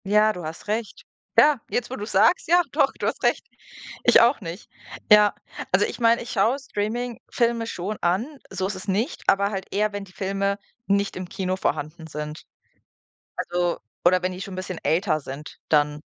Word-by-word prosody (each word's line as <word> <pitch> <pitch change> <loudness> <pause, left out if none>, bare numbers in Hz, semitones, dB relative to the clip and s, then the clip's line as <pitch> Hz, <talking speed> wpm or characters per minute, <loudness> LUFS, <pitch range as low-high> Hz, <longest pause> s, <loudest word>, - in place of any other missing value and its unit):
Ja, 210 +2 +4
du 180 - -7
hast 160 +5 -7
recht. 215 +1 -3 0.3
Ja, 295 -5 +6
jetzt, 245 -1 -1
wo - - -2
du 205 - -6
es 210 - -6
sagst, 210 - +4
ja, 350 +1 +6
doch, - - +3
du - - -5
hast - - -3
recht. - - +2 0.6
Ich 240 - +7
auch 235 +2 +4
nicht. 170 +1 -7 0.4
Ja, 210 -1 +7 0.4
also, - - +4
ich - - -6
meine, 230 0 +4
ich 240 - -8
schaue 225 +5 +2
Streaming-Filme 235 0 -2
schon 205 0 -4
an, 230 - 0
so 190 - -2
ist 200 - -4
es 185 - -9
nicht, 210 - -1
aber 200 +1 +3
halt 190 -2 -4
eher, 210 +1 +1
wenn 205 0 -4
die 195 - -14
Filme 195 +1 -1 0.3
nicht 200 0 +1
im 185 -1 -6
Kino 185 -1 -2
vorhanden 160 -2 -3
sind. 150 0 -6 0.9
Also, 175 0 -1 0.3
oder 180 +1 +4
wenn 185 0 -1
die 180 - -8
schon 195 -1 -6
'n - - -7
bisschen 185 -2 -5
älter 165 -2 +1
sind 140 +2 -9
dann. 150 -1 +2
200 Hz, 195 wpm, -24 LUFS, 180-225 Hz, 0.9 s, Ich